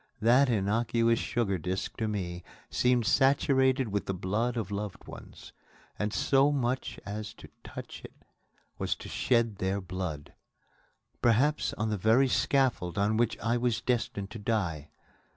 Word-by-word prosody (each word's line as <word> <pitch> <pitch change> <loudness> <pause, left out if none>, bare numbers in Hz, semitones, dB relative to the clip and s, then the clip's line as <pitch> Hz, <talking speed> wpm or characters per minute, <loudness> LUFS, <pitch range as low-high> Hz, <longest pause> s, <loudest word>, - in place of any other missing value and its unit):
That 125 +5 +4
innocuous 115 +2 +1
sugar 100 -6 -1
disc 90 +3 -3
to 110 - -1
me 90 -5 -3 0.3
seemed 125 -2 +2
saturated 130 -1 +3
with 100 0 -2
the 95 - -1
blood 110 +7 -1
of 105 -4 -3
loved 100 0 -5
ones; - - -11 0.5
and 105 0 -1
so 135 +5 +3
much 130 -2 -2
as 105 +1 -6
to - - -13
touch - - -9
it - - -14 0.5
was - - 0
to - - -10
shed 115 -4 +1
their 95 +2 -1
blood 90 -5 -5 0.9
perhaps 130 +6 +2
on 110 +1 -1
the 105 - 0
very 115 +7 +4
scaffold 125 -12 +1
on 105 +2 +2
which 115 0 +1
I 115 +1 0
was 120 -2 0
destined 110 -5 -2
to 115 - -7
die. 85 -9 -2
110 Hz, 150 wpm, -29 LUFS, 100-125 Hz, 0.9 s, That